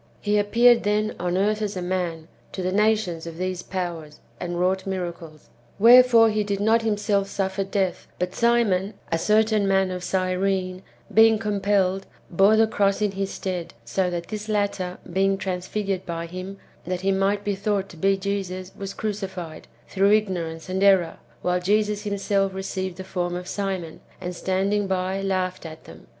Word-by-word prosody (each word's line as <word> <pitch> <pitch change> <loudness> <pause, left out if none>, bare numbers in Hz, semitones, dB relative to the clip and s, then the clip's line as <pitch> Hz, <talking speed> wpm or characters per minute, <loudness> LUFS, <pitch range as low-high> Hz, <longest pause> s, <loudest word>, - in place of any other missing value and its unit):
He 210 0 +1
appeared, 235 +3 +5
then, 210 +1 0
on 180 +1 -1
earth 210 +2 +1
as 205 -2 -2
a - - -3
man, 175 -3 -2 0.3
to 185 - -4
the 185 - 0
nations 210 -5 +1
of 165 -1 -8
these 185 0 -3
powers, 170 -5 -5 0.2
and 175 0 -4
wrouo'ht 185 +2 0
miracles. 170 -5 -6 0.3
Wherefore 235 0 +7
he 210 0 0
did 200 -1 -2
not 220 +3 +3
himself 205 -2 0
suffer 195 0 -2
death, 190 -2 -2
but 180 +1 -2
Simon, 220 -4 +2 0.2
a 165 - +1
certain 215 +1 +2
man 190 -1 +2
of 180 -1 -5
Cyrene, 185 0 -1 0.3
being 220 0 +6
compelled, 200 -3 0 0.2
bore 195 +5 +5
the 225 +1 +5
cross 200 -2 +1
in 210 -1 +1
his 195 0 -3
stead; 180 -6 -5
so 180 +10 0
that 170 -1 -5
this 215 0 -5
latter 200 -3 -1 0.2
being 195 +1 +2
transfigured 190 +1 -3
by 170 -2 -4
him, 185 +3 -7 0.3
that 180 0 -2
he 195 +1 +1
might 195 +1 +1
be 205 - -1
thought 200 0 -1
to - - -12
be 195 +4 +2
Jesus, 190 -1 -4
was 195 0 -6
crucified, 190 -6 -5 0.2
through 200 +1 +3
ignorance 175 -6 -1
and 185 +1 -2
error, 190 -4 +4 0.3
while 180 0 +1
Jesus 210 +2 0
himself 200 -1 0
received 190 -1 -4
the 190 - -6
form 175 -2 -3
of 180 0 -6
Simon, 190 -5 -4 0.2
and, 180 -1 -5
standing 195 +3 0
by, 190 +1 -1
laughed 185 -1 -1
at 160 -1 -9
them. 80 0 -14
195 Hz, 170 wpm, -24 LUFS, 180-205 Hz, 0.3 s, Wherefore